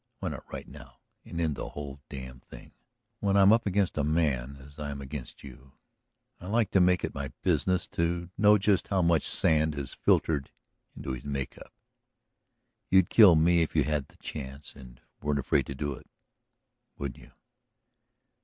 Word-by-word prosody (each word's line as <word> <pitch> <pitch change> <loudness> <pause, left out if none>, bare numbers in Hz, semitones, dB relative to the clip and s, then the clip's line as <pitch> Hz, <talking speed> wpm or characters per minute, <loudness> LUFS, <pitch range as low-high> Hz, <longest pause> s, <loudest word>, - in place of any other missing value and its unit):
Why - - -3
not - - -9
right - - -7
now - - -13 0.3
and 85 - -7
end 80 -3 0
the - - -5
whole 70 -1 -8
damned 65 -2 -9
thing? - - -13 0.5
When 100 -1 +2
I'm 100 +1 +7
up 115 -2 +2
against 95 -4 0
a - - +2
man 70 -4 0
as 70 +2 -15
I 75 -1 -4
am 70 -1 -5
against 70 -1 -8
you 65 0 -13 0.7
I 90 - -9
like 110 0 +1
to 95 - +4
make 90 0 +3
it - - -3
my 70 -2 -5
business 90 -1 +1
to 85 +1 -2
know 105 0 +6
just 100 -1 +1
how 95 -2 +1
much 85 -2 +2
sand 80 -1 +2
has 70 -2 -5
filtered 70 -4 +1 0.5
into - - -5
his 65 0 -5
make 70 -2 -4
up. - - -13 1.2
You'd 95 -2 +4
kill 100 -7 +8
me 85 +2 +4
if 80 - -2
you - - +4
had 75 -3 -1
the - - -23
chance 70 0 -8
and 65 -2 -14 0.2
weren't 75 -1 0
afraid 70 -1 +1
to 70 - -5
do 75 +1 -3
it, - - -14 0.9
wouldn't 70 -2 -5
you?" - - -18
75 Hz, 180 wpm, -28 LUFS, 70-90 Hz, 1.2 s, kill